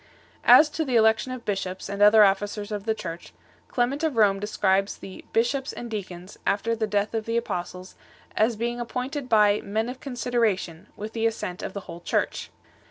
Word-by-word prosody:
As 310 - +9
to 320 - -1
the 260 -5 -2
election 220 +3 +3
of 255 -2 -7
bishops 190 -2 -3
and 200 +1 -4
other 210 +1 +8
officers 205 +1 0
of 205 -1 -4
the 220 - +1
Church, 170 -5 -7 0.3
Clement 255 +4 0
of 315 -5 0
Rome 205 -3 +4
6 - - -9
describes 195 -1 +1
the 190 - -10
"bishops 260 +4 0
and 235 -1 -7
deacons," 185 -2 -7
after 225 +3 0
the 220 -1 -1
death 205 +1 0
of 220 -1 -2
the 230 0 0
apostles, 180 -4 -4 0.4
as 220 +2 +2
being 240 +2 -3
ap 240 - -4
pointed 255 +2 -4
by 210 -2 +4
" - - -17
men 220 +4 -2
of 255 +1 -7
consideration 230 - -1
" - - -34
with 215 +2 -6
the 225 0 +1
assent 185 -5 -4
of - - -5
the 200 - -5
whole 170 -2 -9
Church. - - -2
215 Hz, 205 wpm, -25 LUFS, 195-240 Hz, 0.4 s, As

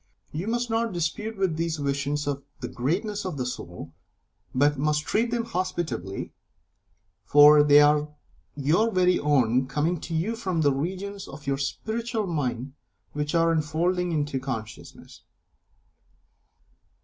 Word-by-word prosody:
You 165 +7 -4
must 240 +1 0
not 225 -1 0
dispute 210 +6 -3
with 185 -5 0
these 165 -1 -1
visions 140 +1 -1
of 140 -1 -2 0.2
the 125 - -4
greatness 195 - -2
of 180 -6 -4
the 125 - -2
soul, 85 -9 -7 0.6
but 145 +3 +3
must 150 +2 0
treat 230 +3 +1
them 235 -1 -1
hospitably, 175 - -3 0.9
for 145 +1 +7
they 145 0 +7
are 150 0 +3 0.5
your 155 +11 +2
very 180 -2 +3
own, 130 -3 +2
coming 155 +5 0
to 165 - -4
you 195 +9 0
from 185 -7 -1
the 145 -2 +3
regions 190 +7 -4
of 145 +2 -11
your 135 0 -1
Spiritual 220 - -2
Mind 135 -6 -3 0.4
which 150 +2 -2
are 165 0 +4
unfolding 170 +3 0
into 145 -4 -1
consciousness. 120 -5 -7
155 Hz, 135 wpm, -26 LUFS, 140-185 Hz, 0.9 s, for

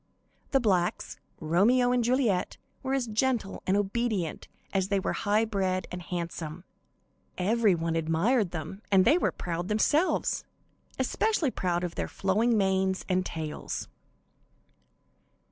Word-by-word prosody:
The 270 - +3
blacks, 185 -7 0 0.2
Romeo 215 +10 +3
and 250 -1 +2
Juliet, 235 -6 +1 0.2
were 265 0 -1
as 265 -3 0
gentle 225 -1 -1
and 190 +2 +3
obedient 205 -4 -1 0.3
as 190 -1 +1
they 200 0 +1
were - - -1
high 210 +2 +1
bred 190 -4 -1
and 180 - -5
handsome. 170 -1 -5 0.7
Every 210 +1 +3
one 165 0 -2
admired 170 +7 +2
them, 175 +4 -6
and 190 -2 +5
they 305 +8 +5
were - - +1
proud 175 0 -4
themselves, 290 - +1 0.5
especially 425 - +1
proud 175 -4 -1
of 175 -1 -3
their - - -3
flowing 220 +5 +1
manes 190 -1 +1
and 185 -1 +1
tails. 160 -4 -5
195 Hz, 130 wpm, -28 LUFS, 180-235 Hz, 0.7 s, and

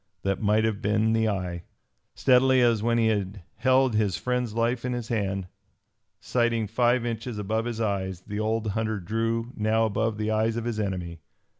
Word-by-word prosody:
That 100 0 -1
might 105 +1 +3
have 110 -2 -1
been 110 +2 +2
the 110 -1 +2
eye. 90 -4 -3 0.5
Steadily 130 0 +4
as 115 -3 +3
when 115 +1 +1
he 115 - +3
had 100 -3 -2
held 130 -1 +3
his 105 -4 +1
friend's 125 -3 -2
life 115 +1 0
in 125 0 -1
his 120 -2 -5
hand, 95 -4 -1 0.7
sighting 120 -2 0
five 120 +3 +1
inches 115 0 -4
above 110 +2 -1
his 120 -2 -4
eyes, 95 -4 -2
the 105 +3 -5
old 110 0 -1
hunter 110 0 -1
drew 115 +5 -2
now 110 +1 +2
above 110 0 -1
the 110 0 -1
eyes 110 +1 +1
of 115 - -3
his 115 -2 -2
enemy. 90 -5 -3
110 Hz, 180 wpm, -26 LUFS, 105-115 Hz, 0.7 s, Steadily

